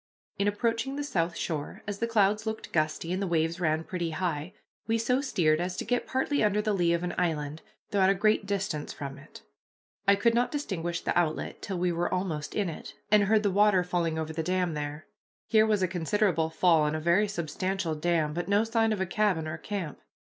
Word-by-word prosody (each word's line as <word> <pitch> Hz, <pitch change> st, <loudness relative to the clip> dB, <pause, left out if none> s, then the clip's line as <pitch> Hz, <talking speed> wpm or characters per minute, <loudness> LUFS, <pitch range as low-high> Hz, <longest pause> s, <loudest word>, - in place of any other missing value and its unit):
In 200 Hz, -, +2 dB
approaching 230 Hz, +5 st, 0 dB
the 290 Hz, -, -2 dB
south 170 Hz, -, -1 dB
shore, 160 Hz, +7 st, -4 dB
as 205 Hz, -1 st, -4 dB
the 230 Hz, -, 0 dB
clouds 215 Hz, -1 st, +2 dB
looked 220 Hz, 0 st, -4 dB
gusty 155 Hz, +2 st, 0 dB
and 185 Hz, -, -2 dB
the 195 Hz, -, -1 dB
waves 165 Hz, 0 st, 0 dB
ran 160 Hz, -2 st, +1 dB
pretty 175 Hz, -1 st, -3 dB
high, 160 Hz, -1 st, -2 dB, 0.4 s
we 225 Hz, 0 st, +2 dB
so 250 Hz, +4 st, +1 dB
steered 170 Hz, -, +2 dB
as 180 Hz, +1 st, -3 dB
to -, -, -3 dB
get 245 Hz, 0 st, 0 dB
partly 265 Hz, +1 st, 0 dB
under 210 Hz, 0 st, +2 dB
the 210 Hz, 0 st, 0 dB
lee 175 Hz, -3 st, +2 dB
of 170 Hz, 0 st, -1 dB
an 180 Hz, -, -2 dB
island, 155 Hz, -3 st, -1 dB, 0.3 s
though 200 Hz, -, +2 dB
at 190 Hz, -, +5 dB
a 195 Hz, -, +4 dB
great 215 Hz, +1 st, +2 dB
distance 195 Hz, -6 st, -2 dB
from 140 Hz, 0 st, -7 dB
it. 150 Hz, -, -14 dB, 0.6 s
I 200 Hz, -, +7 dB
could 230 Hz, +4 st, +2 dB
not 240 Hz, +1 st, +1 dB
distinguish 175 Hz, -, -3 dB
the -, -, -1 dB
outlet 165 Hz, -3 st, -1 dB
till 195 Hz, -2 st, -4 dB
we 180 Hz, 0 st, +1 dB
were 170 Hz, +1 st, -1 dB
almost 165 Hz, -5 st, -2 dB
in 205 Hz, -3 st, +1 dB
it, 165 Hz, -, -7 dB, 0.2 s
and 210 Hz, -1 st, +6 dB
heard 215 Hz, +1 st, +3 dB
the 200 Hz, -, +2 dB
water 200 Hz, -1 st, +4 dB
falling 175 Hz, -3 st, -1 dB
over 160 Hz, 0 st, -3 dB
the 160 Hz, -, -2 dB
dam 180 Hz, 0 st, 0 dB
there. 150 Hz, 0 st, -5 dB, 0.4 s
Here 220 Hz, -1 st, +4 dB
was 210 Hz, -3 st, +2 dB
a -, -, +3 dB
considerable 175 Hz, -1 st, +1 dB
fall, 160 Hz, -2 st, +3 dB
and 150 Hz, -, -1 dB
a -, -, -1 dB
very 170 Hz, +6 st, +3 dB
substantial 185 Hz, 0 st, -2 dB
dam, 155 Hz, -1 st, 0 dB
but 175 Hz, +2 st, -3 dB
no 205 Hz, +2 st, +4 dB
sign 225 Hz, -1 st, +1 dB
of 200 Hz, -, -3 dB
a -, -, +1 dB
cabin 185 Hz, -4 st, 0 dB
or 155 Hz, +1 st, -5 dB
camp. 185 Hz, -8 st, -5 dB
180 Hz, 220 wpm, -28 LUFS, 160-210 Hz, 0.6 s, I